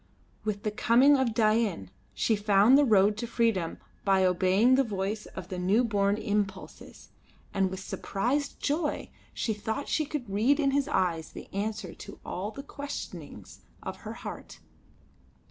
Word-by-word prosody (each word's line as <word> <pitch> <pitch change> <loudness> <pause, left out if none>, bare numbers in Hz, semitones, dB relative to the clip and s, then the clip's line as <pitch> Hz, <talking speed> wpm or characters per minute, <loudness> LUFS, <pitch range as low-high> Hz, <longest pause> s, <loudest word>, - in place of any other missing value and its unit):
With 210 -1 -3
the 215 - 0
coming 250 +7 +5
of 255 -5 +1
Dain 215 - +1 0.2
she 225 - +2
found 205 +3 +5
the 290 +1 +6
road 205 -3 +4
to 235 +1 -3
freedom 225 -7 0 0.3
by 190 -1 +3
obeying 185 +6 +4
the 270 +1 +5
voice 210 -1 -3
of 185 -1 -9
the 185 - -4
new 195 +7 +3
born 205 -3 +1
impulses, 205 -3 -4 0.4
and 195 -1 +2
with 190 0 -6
surprised 245 +10 -2
joy 295 +1 -1 0.2
she 220 - -1
thought 220 +7 -4
she 310 - +1
could 280 -5 -4
read 225 +9 +2
in 275 -2 +2
his 280 0 +1
eyes 170 - 0
the - - -10
answer 200 -3 -3
to - - -11
all 190 +3 -3
the 275 +5 -8
questionings 285 0 -8 0.2
of - - -5
her - - -7
heart. - - -8
215 Hz, 160 wpm, -28 LUFS, 195-250 Hz, 0.4 s, the